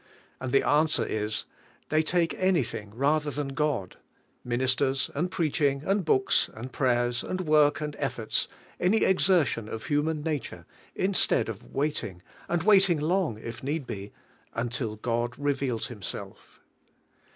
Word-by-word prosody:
And 130 -1 -4
the 135 - +3
answer 155 +2 +3
is: 110 0 -2 0.4
They 155 0 +3
take 165 +1 +1
anything 165 - +1
rather 150 +4 +2
than 145 -1 -3
God, 135 -9 -1 0.2
— - - -23
minis 130 +2 +2
ters, 135 0 0
and 175 +6 -1
preaching, 150 -5 0
and 195 0 +1
books, 130 -5 +2
and 120 +4 -7
prayers, 120 -2 +1
and 185 - -3
work, 150 -3 +4
and 150 -1 -3
efforts, 120 -5 0 0.3
any 190 +5 +3
exertion 175 - +3
of 110 - -6
human 150 +1 0
nature, 135 - -4 0.3
instead 185 - +2
of 105 -3 -6
waiting, 135 - -2 0.3
and 170 -1 0
waiting 195 -5 +5
long 165 - 0
if 115 +1 -7
need 145 +2 -2
be, 100 -3 -6 0.4
until 115 -1 -2
God 120 +2 -2
reveals 140 -4 -1
Himself. 105 -7 -7
140 Hz, 140 wpm, -28 LUFS, 120-160 Hz, 0.4 s, waiting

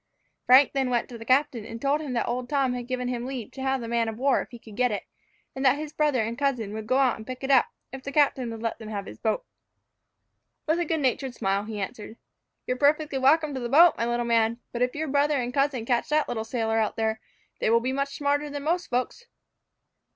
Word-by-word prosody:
Frank 260 +3 +7
then 270 -2 0
went 240 -1 0
to 240 - -8
the 225 - -9
captain, 260 -2 +2
and 230 +1 -8
told 285 +3 +1
him 285 -5 -4
that 235 - 0
old 245 +1 -3
Tom 275 -3 +1
had 245 -1 -5
given 250 -1 -2
him 245 -1 -3
leave 255 -3 -5
to 265 - -9
have 265 -1 0
the 230 - -5
man 230 -1 0
of 220 - -7
war 270 +2 +2
if - - -9
he 240 - -10
could 220 -2 -14
get 250 +1 +2
it; 205 - -3 0.5
and 265 - -3
that 265 +1 +4
his 305 0 -6
brother 295 -6 +2
and 230 +2 -4
cousin 250 -8 -1
would 215 0 -6
go 255 - +2
out 265 -3 +3
and 220 - -11
pick 255 +1 -7
it 265 - 0
up, 275 - +5 0.2
if 265 - -7
the 280 - -6
captain 275 -4 +2
would 225 0 -7
let 230 - -2
them 220 -1 -8
have 200 -2 -4
his - - -10
boat. - - -1 1.2
With 320 +2 +1
a 345 - 0
good 320 -1 -1
natured 260 -1 -1
smile, 195 0 0
he 215 -1 -5
answered, 210 +3 -6 0.5
"You - - 0
are - - -7
perfectly 290 0 +2
welcome 295 +3 +3
to 265 - -3
the 240 -1 -4
boat, 330 +6 +7
my 230 - -1
little 240 0 0
man; 230 0 +2
but 240 - -4
if 250 +2 +1
your 315 +1 -2
brother 290 +1 +2
and 245 0 -3
cousin 275 -4 0
catch 240 -1 0
that 305 0 +2
little 225 -2 -3
sailor 225 -1 0
out 215 - 0
there, 220 0 -1 0.4
they - - +1
will 230 +1 +5
be 255 +3 -2
much 275 +1 -2
smarter 290 +1 0
than 285 0 -5
most 345 +4 0
folks." 255 - -3
255 Hz, 255 wpm, -26 LUFS, 230-280 Hz, 1.2 s, Frank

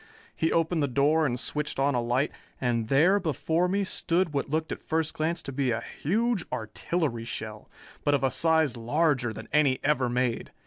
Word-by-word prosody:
He 160 - 0
opened 165 0 +1
the 145 - +2
door 145 +4 +3
and 125 -1 -2
switched 150 +3 -2
on 140 +1 +2
a 120 - +1
light, 125 +5 0 0.3
and 120 -3 0
there 165 - +4
before 165 +1 0
me 200 +2 +1
stood 175 -3 0
what 140 -1 -1
looked 155 +2 -1
at - - -5
first 160 -1 -1
glance 165 +2 -1
to 140 - -6
be 135 -1 0
a 115 0 -1 0.2
huge 220 +4 +1
artillery 120 +3 -2
shell, 110 -2 -7 0.3
but 145 - +3
of 135 - -1
a 135 - +2
size 160 -2 +2
larger 130 +1 +1
than 110 - -8
any 145 -4 +4
ever 135 -4 +2
made. 125 -1 -1
145 Hz, 190 wpm, -27 LUFS, 125-160 Hz, 0.3 s, there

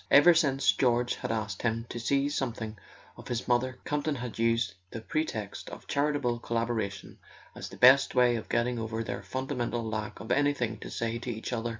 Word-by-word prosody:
Ever 170 +5 +8
since 140 -5 +3
George 120 -1 +2
had 125 - -3
asked 110 -3 -3
him 115 -1 -1
to 120 - -5
see 140 +4 +1
something 120 -6 -3 0.4
of - - -11
his 120 0 -3
mother 125 +1 +1
Campton 150 0 -1
had 120 -3 -6
used 115 -1 +2 0.2
the 115 - -6
pretext 110 -5 -3
of - - -10
charitable 140 -4 0
collabora¬ 115 -3 -1
tion 100 -1 -12 0.3
as - - -7
the - - -11
best 130 +2 +6
way 125 -1 +5
of 115 - -5
getting 120 0 +1
over 110 0 -3
their - - -4
fundamental 125 -3 -3
lack 110 -1 -4
of 110 - -6
anything 140 -6 +1
to - - -8
say 115 0 -2
to 120 - -6
each 115 +1 -4
other. 120 0 -1
120 Hz, 195 wpm, -29 LUFS, 115-135 Hz, 0.4 s, Ever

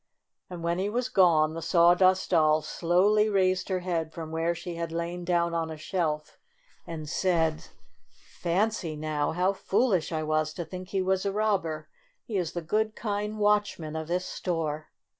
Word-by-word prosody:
And 175 -2 -7
when 170 +1 0
he 195 +2 0
was 245 +3 -1
gone 165 -7 +4
the 165 - -5
Sawdust 180 +3 +4
Doll 155 -2 +4
slowly 200 +5 +2
raised 185 -2 +1
her 185 -1 0
head 165 -3 -2
from 160 -1 -7
where 165 +1 0
she 175 +1 -6
had 170 -1 -4
lain 170 +1 -3
down 170 -1 +1
on 165 -1 -1
a 160 - -6
shelf 155 -2 -2 0.5
and 155 -2 -6
said: 160 -1 +1 0.4
"Fancy 180 -2 -2
now! 150 -1 -1
How 180 +3 +2
foolish 195 - +1
I 160 -1 -1
was 155 0 0
to 170 - -4
think 185 +2 -8
he 195 -1 0
was 190 0 +1
a 200 - 0
robber! 195 -7 -1 0.4
He 220 - -6
is 180 -4 -1
the 175 - -4
good, 215 +6 0
kind 210 0 -3
watchman 205 -7 +1
of 160 -1 -4
this 180 +2 -1
store." 155 -5 -3
175 Hz, 175 wpm, -28 LUFS, 160-190 Hz, 0.5 s, gone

